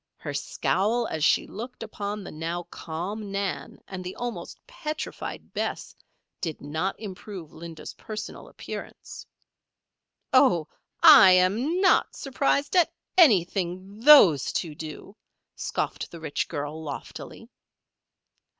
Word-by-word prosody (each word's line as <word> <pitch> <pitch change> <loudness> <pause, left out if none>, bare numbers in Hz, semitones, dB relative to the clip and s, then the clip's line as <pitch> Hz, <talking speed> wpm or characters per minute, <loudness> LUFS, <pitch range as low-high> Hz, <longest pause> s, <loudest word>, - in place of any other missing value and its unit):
Her - - -6
scowl 225 +5 0
as 155 -8 -3
she - - +4
looked 240 +3 -8
upon 210 -1 -5
the - - -8
now 165 +3 -4
calm 195 +6 -5
Nan 200 -1 -3
and 185 -1 -6
the 180 +1 -6
almost 245 -1 -5
petrified 305 0 -6
Bess, - - -4 0.5
did 165 -5 -3
not 160 +7 -3
improve 190 -5 -8
Linda's 165 -1 -9
personal 215 -1 -8
appearance. - - -9 1.1
"Oh! 250 - +4 0.4
I 285 - +10
am 215 - +2
not 380 - +3
surprised 280 +2 0
at 355 -3 +4 0.2
anything 195 - +3
those 225 - +7
two 165 -4 -3
do," 155 +6 -9 0.4
scoffed - - -3
the 170 - -10
rich 160 -2 -2
girl, 145 +2 -5
loftily. 145 -3 -8
195 Hz, 115 wpm, -26 LUFS, 165-235 Hz, 1.1 s, I